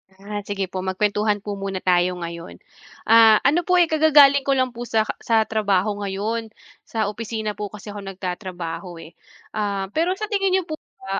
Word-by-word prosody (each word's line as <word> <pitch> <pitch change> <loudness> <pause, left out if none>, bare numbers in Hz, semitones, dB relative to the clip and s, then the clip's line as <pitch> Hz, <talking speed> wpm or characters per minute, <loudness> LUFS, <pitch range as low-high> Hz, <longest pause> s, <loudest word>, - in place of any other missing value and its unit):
Ah, 205 +2 -6
sige 195 -2 -3
po 190 - -4
magkuwentuhan 205 +2 0
po 205 -1 -5
muna 195 -1 -4
tayo 180 0 +2
ngayon. 170 - -7 0.5
Ah, 225 -1 +6
ano 320 +5 +2
po, 365 - +3
eh, 345 -3 +4
kagagaling 290 -3 +5
ko 275 - +3
lang 255 -1 +1
po 240 0 -7
sa 220 -1 +2 0.2
sa 225 -1 +2
trabaho 205 -2 0
ngayon, 205 +3 -3 0.4
sa 220 -3 -1
opisina 220 -1 -4
po 210 0 -5
kasi 210 +1 -10
ako 205 -1 -8
nagtatrabaho, 180 -2 -6
eh. 160 - -13 0.4
Ah, 200 -2 -2
pero 340 - 0
sa 430 +1 -5
tingin 390 -2 +2
n'yo 380 - +1
po 310 -2 -7 0.2
ba, 195 0 -2
210 Hz, 180 wpm, -22 LUFS, 195-240 Hz, 0.5 s, Ah